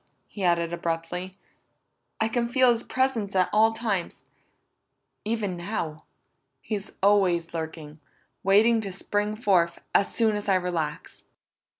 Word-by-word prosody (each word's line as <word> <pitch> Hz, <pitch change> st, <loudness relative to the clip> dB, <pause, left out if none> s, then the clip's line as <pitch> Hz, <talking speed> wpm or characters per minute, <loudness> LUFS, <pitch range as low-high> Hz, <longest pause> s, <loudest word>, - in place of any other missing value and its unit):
he 200 Hz, -, -7 dB
added 170 Hz, -1 st, +1 dB
abruptly. 170 Hz, +2 st, -3 dB, 0.8 s
"I 220 Hz, -, +2 dB
can 235 Hz, +1 st, 0 dB
feel 255 Hz, 0 st, +4 dB
his 235 Hz, -1 st, 0 dB
presence 240 Hz, -8 st, -1 dB
at 185 Hz, -1 st, +2 dB
all 220 Hz, +1 st, +5 dB
times 220 Hz, -6 st, -3 dB, 1.0 s
even 210 Hz, -4 st, -1 dB
now. 175 Hz, -4 st, -4 dB, 0.5 s
He's 205 Hz, -2 st, -5 dB
always 185 Hz, -5 st, +3 dB
lurking, 160 Hz, -2 st, -6 dB, 0.4 s
waiting 220 Hz, +4 st, +4 dB
to 200 Hz, -2 st, -4 dB
spring 205 Hz, +2 st, -1 dB
forth, 185 Hz, -7 st, +2 dB
as 200 Hz, -, +3 dB
soon 220 Hz, -2 st, +2 dB
as 205 Hz, 0 st, -3 dB
I 195 Hz, -, +5 dB
relax!" 170 Hz, -5 st, -3 dB
195 Hz, 125 wpm, -26 LUFS, 170-220 Hz, 1.0 s, all